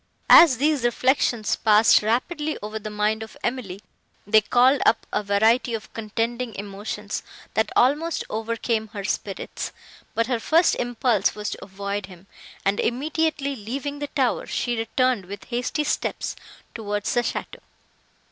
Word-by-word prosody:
As 315 -7 +9
these 290 0 +1
reflections 240 -2 +1
passed 215 0 +5
rapidly 295 +8 -1
over 215 +1 -4
the 215 0 -6
mind 210 +1 0
of 220 - -9
Emily, 230 -7 -3 0.5
they 215 +2 +5
called 250 +5 +4
up 230 - +3
a - - +1
variety 220 +4 +2
of 210 -6 -9
contending 230 +1 -3
emotions, 205 +1 -5 0.3
that 220 -1 +1
almost 300 +6 +2
overcame 225 0 -2
her 200 -2 -5
spirits; 195 0 -4 0.4
but 230 - +2
her 245 -1 -1
first 325 +9 +3
impulse 240 -4 +1
was 210 0 -4
to - - -7
avoid 200 0 -4
him, 180 -1 -14 0.4
and, 200 +1 +1
immediately 290 +2 -1
leaving 275 +6 -5
the 290 - -3
tower, 265 -4 0
she 240 -1 -1
returned, 235 -1 0
with 200 +2 -8
hasty 250 +5 -2
steps, 295 - -2 0.4
towards 205 -1 -3
the 240 - +3
château. 235 - -5
230 Hz, 145 wpm, -24 LUFS, 210-255 Hz, 0.5 s, As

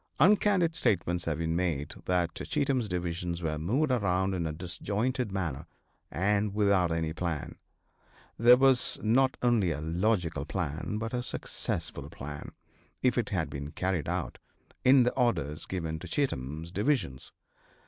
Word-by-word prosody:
Uncandid 185 -1 +4
statements 90 - 0
have 80 -3 -1
been 80 0 -1
made 80 -5 -1
that 90 -2 +1
Cheatham's 130 - -1
divisions 85 -1 -3
were 75 -1 -1
moved 130 - +1
around 95 -5 +1
in 85 -3 -1
a - - -2
disjointed 100 +8 -2
manner 85 -5 -3 0.4
and 100 +2 0
without 100 -4 +3
any 80 -1 -1
plan. 85 -3 -3 0.8
There 120 +2 +7
was 135 -1 +3
not 130 +4 +3
only 115 -7 +3
a 75 -3 -2
logical 85 -1 0
plan 80 +3 -3
but 115 +2 -4
a 125 - 0
successful - - -4
plan, 70 +1 -8 0.5
if - - +3
it - - 0
had - - 0
been 70 +1 -6
carried 90 -5 -1
out, - - -3 0.4
in 130 0 +7
the 125 - +2
orders 75 - 0
given 80 -4 -3
to - - -8
Cheatham's 80 - -2
divisions. 100 - -1
90 Hz, 145 wpm, -29 LUFS, 80-120 Hz, 0.8 s, There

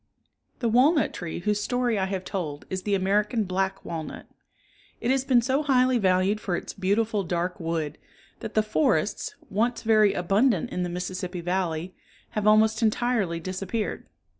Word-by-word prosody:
The 235 - +1
walnut 270 +7 +4
tree 175 -1 -5
whose 210 +2 0
story 245 -1 0
I 190 - +1
have 190 -1 -4
told 155 -8 -4
is 185 0 -2
the 200 +1 0
American 210 +4 +1
black 190 +1 -2
walnut. 160 -2 -6 0.7
It 240 - 0
has 265 -1 +2
been 250 -3 +3
so 265 +4 +1
highly 255 -3 +3
valued 190 +2 +2
for 180 -4 -1
its - - -5
beautiful 205 +2 0
dark 175 +1 -2
wood 165 -3 -3 0.4
that - - -7
the 215 - +4
forests, 160 -1 0 0.2
once 230 +5 0
very 215 -3 +4
abundant 215 +8 +2
in 180 - -2
the 175 - -1
Mississippi 180 0 -4
Valley, 175 -1 -2 0.4
have 210 -1 -1
almost 220 +1 +4
entirely 220 -6 +1
disappeared. 190 +5 -4
200 Hz, 160 wpm, -26 LUFS, 180-225 Hz, 0.7 s, walnut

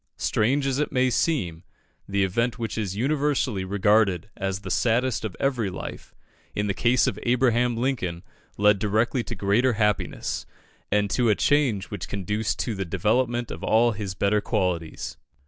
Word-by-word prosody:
Strange 135 +6 +1
as 135 0 0
it 150 - 0
may 130 -1 +2
seem, 115 - 0 0.5
the 100 0 +1
event 115 +6 0
which 115 -3 -4
is 100 -4 -2
universally 135 -5 0
regarded 100 0 +2
as 95 0 -3
the - - -6
saddest 120 +1 +1
of 110 -4 -4
every 125 -7 0
life, 90 - -8 0.4
in 105 - 0
the 100 - 0
case 120 +5 +3
of 105 - -2
Abraham 120 -1 +2
Lincoln 115 -10 -2 0.3
led 105 0 +4
directly 110 +4 +1
to 120 - -6
greater 105 +6 +2
happiness, 105 -2 -1 0.4
and 105 0 +2
to 120 -2 +2
a 105 - +4
change 125 -10 +1
which 90 -4 -5
conduced 105 +2 -2
to 115 - -2
the 95 -1 -3
development 120 +6 0
of - - -7
all 115 +2 +4
his 100 -4 -5
better 100 +2 +2
qualities. 85 -5 -2
110 Hz, 165 wpm, -25 LUFS, 100-125 Hz, 0.5 s, led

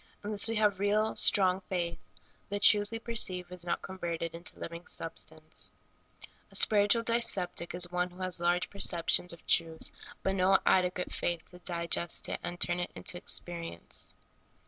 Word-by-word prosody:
Unless 205 +1 +5
we 225 - -1
have 210 -3 +2
real, 210 +2 +1
strong 190 -2 +4
faith, 170 -2 -3 0.5
the 205 - -3
truth 205 0 +5
w^e 225 0 -6
perceive 185 -6 -1
is 180 -1 -7
not 175 - -3
converted 170 -3 -5
into 170 +1 -7
living 170 +1 -8
substance. - - -4 0.8
A - - -12
spiritual 210 +2 +4
dyspeptic 190 -8 0
is 175 0 +3
one 180 0 -1
who 180 +1 -13
has 185 -1 -2
large 175 +1 +1
perceptions 180 -2 +2
of 170 - -8
truth, 165 -1 0 0.3
but 190 - 0
no 190 0 +4
adequate 180 -1 +1
faith 170 -1 -2
to 180 - -14
digest 170 -1 -1
it - - -3
and 175 0 -6
turn 175 0 +2
it 175 - -3
into - - -3
experience. 170 - -4
180 Hz, 160 wpm, -30 LUFS, 175-200 Hz, 0.8 s, Unless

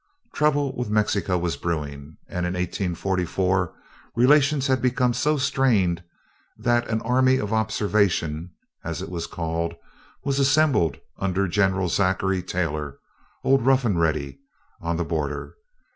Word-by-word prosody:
Trouble 145 -2 +1
with 125 -3 -3
Mexico 105 -3 +1
was 85 -1 -2
brewing, 75 -3 -4
and 90 0 -2
in 90 - -3
1844 90 0 -1 0.4
relations 140 +3 +4
had 130 -1 +1
become 125 -1 +2
so 150 +5 +1
strained 110 -11 +2 0.6
that 120 +1 +1
an 110 0 -1
"Army 130 +2 +3
of 105 -2 -2
Observation," 100 -7 0 0.3
as - - -4
it - - -7
was 85 -2 -4
called, 85 0 -3 0.5
was 140 -1 0
assembled 140 - +3 0.2
under 95 0 0
General 95 0 +1
Zachary 95 +1 +1
Taylor, 75 -6 -3 0.5
old 135 -2 +3
"Rough 135 0 +3
and 100 -7 +1
Ready," 75 - -1 0.4
on 85 0 -1
the 85 - -1
border. 75 -3 -3
95 Hz, 130 wpm, -24 LUFS, 85-125 Hz, 0.6 s, relations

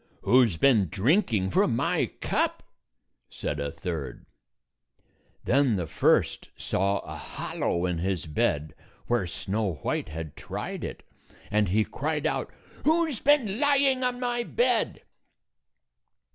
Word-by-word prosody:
"Who's 120 -9 +4
been 110 - +4
drinking 105 - +2
from - - +3
my - - +1
cup?" - - 0 0.7
said 75 - -4
a 70 0 -2
third. 75 -9 -5 1.2
Then 135 -3 +3
the 90 -3 -1
first - - +1
saw 100 +1 0
a 75 - -8
hollow 85 +2 -2
in 90 -2 -1
his 90 -2 -1
bed 75 -1 0 0.3
where 120 -6 0
Snow 100 +3 -2
White - - -1
had 80 -1 -6
tried - - -5
it, - - -6 0.5
and 105 -2 +2
he 105 +4 +3
cried 150 +1 -3
out, - - -1 0.3
"Who 325 +2 +3
's 240 - -4
been 255 -8 +3
lying 275 -2 +3
on 250 0 0
my 245 -1 -1
bed?" 480 - 0
105 Hz, 130 wpm, -27 LUFS, -, 1.2 s, Who's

